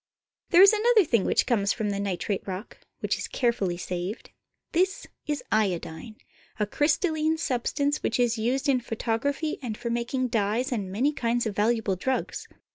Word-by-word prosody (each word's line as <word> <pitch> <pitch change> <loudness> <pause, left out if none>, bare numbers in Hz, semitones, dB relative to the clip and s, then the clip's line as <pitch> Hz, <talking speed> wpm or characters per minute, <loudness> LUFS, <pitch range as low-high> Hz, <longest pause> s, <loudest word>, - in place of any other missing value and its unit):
There 360 +1 +8
is 400 - +8
another 435 -1 +4
thing 230 -8 +2
which - - +2
comes 205 -4 +2
from 215 -3 -2
the 200 - -2
nitrate 200 0 -2
rock, 190 +3 -6 0.2
which - - -1
is - - -4
carefully 220 -8 0
saved. 180 +4 -5 0.4
This 370 +3 +1 0.2
is 295 -4 -2
iodine, 195 -1 -1 0.4
a 210 - +2
crystal 305 - +1
line 315 +1 +1
substance 285 0 -1
which 230 - -1
is 240 -2 +3
used 245 +5 0
in 265 -2 +3
photography 245 +6 -2
and 225 -5 -4
for 235 - -4
mak 235 0 -2
ing 255 -1 +1
dyes 225 +4 0
and 200 -6 -2
many 260 +10 +1
kinds 235 -2 0
of 215 -3 -3
valuable 215 -2 +1
drugs. 260 +8 -2
235 Hz, 175 wpm, -26 LUFS, 205-285 Hz, 0.4 s, There